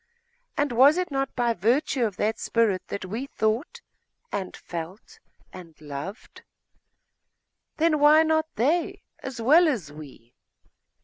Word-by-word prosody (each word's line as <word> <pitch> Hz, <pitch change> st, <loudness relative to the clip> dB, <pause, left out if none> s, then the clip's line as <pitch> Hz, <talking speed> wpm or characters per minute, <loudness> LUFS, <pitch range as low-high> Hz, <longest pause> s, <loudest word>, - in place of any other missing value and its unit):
And 290 Hz, -2 st, +1 dB
was 270 Hz, +7 st, +5 dB
it 365 Hz, -3 st, -2 dB
not 270 Hz, -1 st, -2 dB
by 240 Hz, -2 st, +1 dB
virtue 240 Hz, -, +1 dB
of 205 Hz, -4 st, -4 dB
that 220 Hz, +1 st, -1 dB
spirit 220 Hz, -5 st, +1 dB
that 200 Hz, -, -5 dB
we 225 Hz, +9 st, -5 dB
thought, 250 Hz, -, -2 dB, 0.5 s
and 190 Hz, -2 st, -4 dB
felt, 180 Hz, -, -8 dB, 0.3 s
and 170 Hz, -4 st, -12 dB
loved? 150 Hz, -, -8 dB, 1.4 s
Then 315 Hz, -1 st, +2 dB
why 300 Hz, +2 st, +6 dB
not 315 Hz, 0 st, +1 dB
they, 310 Hz, +10 st, 0 dB, 0.2 s
as 265 Hz, -2 st, -7 dB
well 310 Hz, +9 st, +5 dB
as 210 Hz, -, -2 dB
we? 135 Hz, -6 st, -13 dB
235 Hz, 130 wpm, -25 LUFS, 185-300 Hz, 1.4 s, why